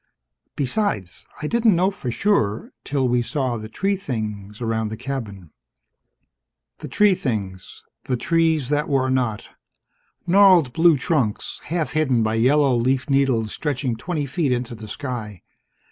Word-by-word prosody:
Besides, 130 - -2 0.2
I - - -1
didn't 225 0 +3
know 185 +3 +2
for 130 -10 -6
sure, 115 - 0
till 135 -2 0
we 125 0 +2
saw 130 -1 -2
the 110 0 -8
tree 195 - 0
things 105 - -5
around 110 -2 -1
the 110 +1 -6
cabin." 110 - -6 1.3
The - - -7
tree 210 -2 +4
things. 100 - -4 0.2
The 125 - -1
trees 160 -2 +1
that 150 +1 0
were 130 -2 +1
not. 125 -5 -1 0.8
Gnarled 180 -7 +5
blue 165 0 +5
trunks, 130 - -1
half 160 -5 -2
hidden 135 -7 +1
by 110 0 0
yellow 130 +3 +3
leaf 130 +3 0
needles 130 -6 +2
stretching 135 -5 -2
twenty 155 +4 -3
feet 140 0 -1
into 120 -1 -2
the 110 -1 -9
sky. 110 - -6
130 Hz, 145 wpm, -22 LUFS, 110-155 Hz, 1.3 s, Gnarled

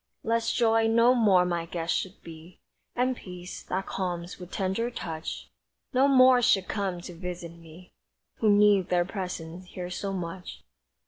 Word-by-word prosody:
Lest 230 0 0
joy 225 -1 +3
no 230 +2 +5
more 200 -7 +4
my 170 -1 -2
guest 165 -1 -2
should 190 +1 -4
be, 165 +2 -12 0.4
And 255 +1 +1
peace, 180 -4 -9
that 190 +1 -3
calms 175 -1 -4
with 180 -1 -9
tender 195 +6 -1
touch, 165 -9 -6 0.4
No 260 +2 +4
more 255 -2 +6
should 195 -5 +3
come 195 -4 -2
to 175 - -9
visit 175 -1 -6
me, 170 +1 -15 0.4
Who 220 - +2
need 205 -2 +4
their 175 -1 +2
presence 180 -2 -6
here 180 0 -7
so 195 +2 -3
much. 180 -1 -6
185 Hz, 155 wpm, -27 LUFS, 175-225 Hz, 0.4 s, more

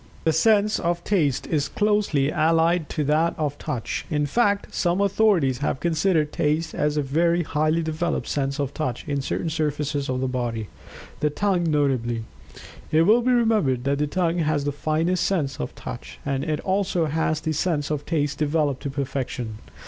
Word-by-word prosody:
The 160 - +2
sense 210 +5 +3
of 170 0 -1
Taste 155 -11 +1
is 145 -3 -1
closely 205 -10 +1
allied 165 +1 +2
to 150 - -1
that 155 +3 +2
of 145 -2 -2
Touch 115 - -3
in 150 -1 +1
fact 205 - +1
some 175 +1 +1
authorities 200 - +2
have 140 -2 -1
considered 160 -2 +1
Taste 155 +2 0
as 150 0 0
a 150 - +1
very 170 +5 +2
highly 155 +2 +1
developed 160 +1 -2
sense 140 -1 -2
of 140 -1 -2
Touch 130 -6 -3
in 140 -1 -1
certain 160 +4 -2
surfaces 150 -3 -1
of 130 0 -1
the 130 - 0
body, 120 -4 -3 0.5
the 150 - +2
tongue 180 +1 0
notably. 130 -6 0 0.7
It 160 +1 +5
will 220 +7 +5
be 255 +2 +2
remembered 215 - +2
that 140 +1 0
the 150 - +1
tongue 175 +1 0
has 150 -3 +1
the 145 - 0
finest 160 +5 0
sense 155 -8 -1
of 65 - -4
Touch, 65 +2 -8
and 140 -1 -1
it 155 -1 -1
also 190 -3 0
has 155 0 0
the 155 0 -2
sense 155 -2 -1
of 150 -1 -2
Taste 150 -3 -1
developed 150 -3 0
to 140 - -3
perfection. 130 -5 -4
155 Hz, 180 wpm, -24 LUFS, 140-170 Hz, 0.7 s, It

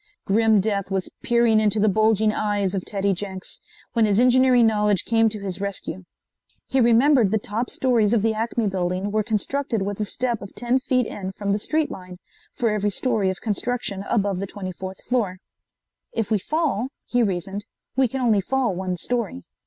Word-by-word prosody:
Grim 220 +1 +3
death 200 -2 -1
was 190 -1 -2
peering 235 -2 +3
into 215 0 +2
the 215 - +3
bulging 215 +1 +3
eyes 205 -3 0
of 190 -2 -2
Teddy 200 -1 0
Jenks, 190 0 -4 0.3
when 230 -2 +3
his 205 0 +2
engineering 250 -1 +5
knowledge 210 -3 +2
came 225 -1 +3
to 210 0 -5
his 190 -1 -3
rescue. 195 -2 -2 0.6
He 265 0 +1
remembered 240 0 +5
the 220 - +2
top 215 +4 -3
stories 235 -5 +2
of 230 -3 +2
the 225 0 +2
Acme 225 +1 -1
building 185 0 -1
were 215 +1 +1
constructed 225 +1 -1
with 200 +1 -4
a 210 - 0
step 240 +1 -1
of 200 - -10
ten 245 +2 +1
feet 255 -2 +1
in 190 -3 -5
from 200 0 -3
the 205 - +1
street 310 +7 0
line, 180 -1 -9 0.3
for 230 -3 0
every 210 -1 0
story 215 -2 0
of 185 - -4
construction 210 -2 -2
above 200 -4 +1
the 195 - -3
24th 190 -1 -7
floor. 215 -7 -1 0.8
"If 225 -1 -2
we 215 - +3
fall," 290 - -1 0.2
he 245 - +1
reasoned, 195 -1 -2 0.3
"we 265 0 +3
can 265 +3 -4
only 220 -5 +3
fall 260 +1 0
one 185 0 -3
story." 210 - -2
215 Hz, 185 wpm, -23 LUFS, 195-235 Hz, 0.8 s, engineering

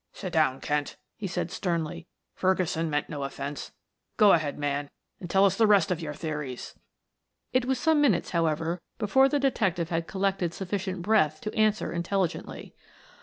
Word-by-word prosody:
"Sit 185 -3 -6
down, 145 -5 +2
Kent," 150 -1 -1 0.2
he 210 - -4
said 175 -2 -3
sternly. 170 -1 -2 0.3
"Ferguson 180 -3 0
meant 145 -1 -1
no 150 -3 -5
offense. 140 +1 -5 0.5
Go 210 -3 +7
ahead, 155 -4 +1
man, 145 0 -2 0.3
and 175 - -7
tell 195 +2 +5
us 195 -1 +3
the 220 +1 +4
rest 200 -4 +4
of 175 -2 -1
your 150 -2 -5
theories." 150 -5 -5 0.8
It 255 -1 +2
was 265 0 +1
some 315 +1 +3
minutes, 235 -12 +2
however, 165 0 0 0.2
before 265 +6 +4
the 290 - +1
detective 195 - 0
had 165 -1 -1
collected 190 -3 -1
sufficient 190 -1 -3
breath 195 -7 +3
to 215 - -4
answer 215 -1 +1
intelligently. 175 +1 -2
175 Hz, 165 wpm, -27 LUFS, 155-200 Hz, 0.8 s, Go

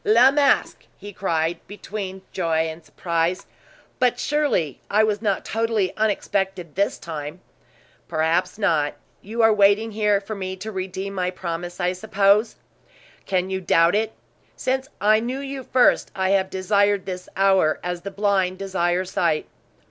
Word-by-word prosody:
"La 235 +5 +6
Masque!" 285 0 +1
he 205 0 -10
cried, 165 -3 -1
between 195 -2 -6
joy 165 -3 0
and 160 +1 -8
surprise. 170 +2 -2 0.5
"But 250 -1 +2
surely, 285 - 0
I 215 +2 +4
was 210 -1 0
not 205 -4 -1
totally 225 -3 0
unexpected 195 -5 -1
this 200 +2 0
time?" 155 0 -7 0.7
"Perhaps 165 +4 0
not. 160 -8 +1 0.3
You 225 +3 -2
are 225 -1 +6
waiting 205 +2 +3
here 210 -1 +2
for 205 +2 -7
me 190 -2 -4
to 210 +4 -7
redeem 190 0 -4
my 180 -2 -1
promise, 175 0 -5
I 180 0 +1
suppose?" 205 +2 +2 0.7
"Can 185 0 0
you 190 0 -2
doubt 165 -1 +4
it? 220 +1 0 0.4
Since 265 +1 -1
I 215 +2 +4
knew 245 +3 -3
you 275 -1 -5
first, 250 0 +3
I 190 -1 0
have 190 -1 +2
desired 200 +1 +1
this 180 -1 -6
hour 190 -5 +3
as 175 -1 -3
the 200 - -5
blind 195 -2 0
desire 185 -2 0
sight." 170 -4 0
195 Hz, 150 wpm, -23 LUFS, 180-215 Hz, 0.7 s, La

